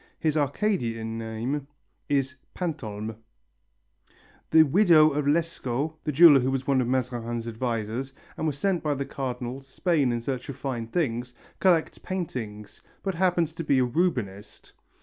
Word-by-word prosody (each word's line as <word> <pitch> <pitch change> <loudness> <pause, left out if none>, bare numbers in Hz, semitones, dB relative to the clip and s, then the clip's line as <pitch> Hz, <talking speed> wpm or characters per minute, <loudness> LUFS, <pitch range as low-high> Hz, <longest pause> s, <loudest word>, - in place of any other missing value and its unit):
His 155 -1 +1
Arcadian 130 - -1
name 115 +6 -3 0.4
is 135 -2 +1 0.2
Pantolme. 110 - -4 1.3
The 160 - +7
widow 155 -1 +5
of 145 0 -1
Lescot 150 -2 0
the 150 - -1
jeweller 150 -1 +8
who 130 +1 0
was 135 -1 -1
one 135 -2 +3
of 120 - -1
Mazarin's 120 -2 -2
advisers 115 +2 -3 0.2
and 160 - -2
was 145 -2 -2
sent 185 +2 0
by 150 -2 0
the 140 0 -3
Cardinal 125 -1 -4
to 135 0 -22
Spain 150 -6 +1
in 120 - -1
search 130 +3 -4
of 140 - -5
fine 130 -4 -3
things 125 -4 -2 0.2
collects 175 -4 +2
paintings, 110 - -5 0.2
but 195 - -1
happens 170 -2 +1
to 165 - -5
be 140 -3 +2
a 130 - +4
Rubenist. 120 - -2
135 Hz, 150 wpm, -26 LUFS, 120-160 Hz, 1.3 s, jeweller